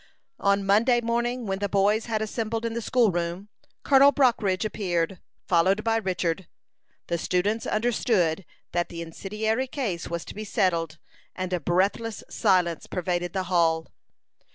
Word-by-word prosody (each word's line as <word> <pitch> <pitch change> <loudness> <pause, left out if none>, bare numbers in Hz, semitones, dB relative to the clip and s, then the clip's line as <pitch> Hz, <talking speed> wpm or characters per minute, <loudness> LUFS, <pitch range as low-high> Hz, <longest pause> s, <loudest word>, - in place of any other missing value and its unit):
On 200 0 +2
Monday 230 +5 +4
morning, 240 +1 -1
when 195 -1 -2
the 205 0 -1
boys 205 +3 +2
had 220 -2 -1
assembled 225 +1 -3
in 230 - -2
the 235 - -3
school 230 -1 +3
room, 175 +3 -3 0.3
Colonel 275 0 +6
Brockridge 225 -9 +2
appeared, 180 -4 -1 0.3
followed 190 +4 +3
by 225 0 +2
Richard. 185 -4 -2 0.6
The 170 -1 -2
students 205 +7 0
understood 215 -6 +1 0.3
that 175 0 -1
the 170 -1 -6
incendiary 215 +9 -2
case 220 - -3
was 170 -1 -4
to - - -8
be 215 - -6
settled, 170 -6 0 0.4
and 185 0 -3
a 180 - +1
breathless 195 +7 0
silence 180 -6 +1
pervaded 175 -1 -2
the 190 -1 -1
hall. 165 -3 +1
195 Hz, 150 wpm, -26 LUFS, 175-225 Hz, 0.6 s, Colonel